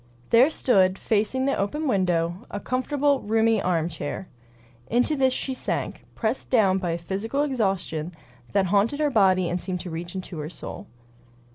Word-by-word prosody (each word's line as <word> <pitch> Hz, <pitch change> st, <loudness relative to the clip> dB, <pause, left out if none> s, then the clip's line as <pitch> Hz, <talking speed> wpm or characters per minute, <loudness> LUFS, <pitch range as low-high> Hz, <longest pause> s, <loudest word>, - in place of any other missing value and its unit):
There 245 Hz, +5 st, +7 dB
stood, 195 Hz, -11 st, +3 dB
facing 220 Hz, +5 st, 0 dB
the 275 Hz, -, +1 dB
open 295 Hz, +11 st, -2 dB
window, 175 Hz, -5 st, 0 dB
a 205 Hz, -, -4 dB
comfortable, 280 Hz, +4 st, +1 dB
roomy 225 Hz, 0 st, +2 dB
armchair. 165 Hz, 0 st, -2 dB, 0.6 s
Into 245 Hz, +6 st, +2 dB
this 265 Hz, -2 st, +3 dB
she 265 Hz, +1 st, -2 dB
sank, 255 Hz, -, -3 dB
pressed 225 Hz, +3 st, -2 dB
down 195 Hz, -6 st, +4 dB
by 175 Hz, -3 st, -1 dB
a -, -, -1 dB
physical 200 Hz, -, -2 dB
exhaustion 195 Hz, -, -1 dB, 0.4 s
that 195 Hz, -1 st, +2 dB
haunted 205 Hz, +9 st, +2 dB
her 300 Hz, -1 st, +2 dB
body 190 Hz, -5 st, +4 dB
and 175 Hz, +1 st, -2 dB
seemed 180 Hz, -2 st, -3 dB
to 180 Hz, -, -7 dB
reach 170 Hz, +3 st, -6 dB
into 185 Hz, -3 st, -5 dB
her 150 Hz, 0 st, -4 dB
soul. -, -, -8 dB
200 Hz, 160 wpm, -25 LUFS, 180-255 Hz, 0.6 s, There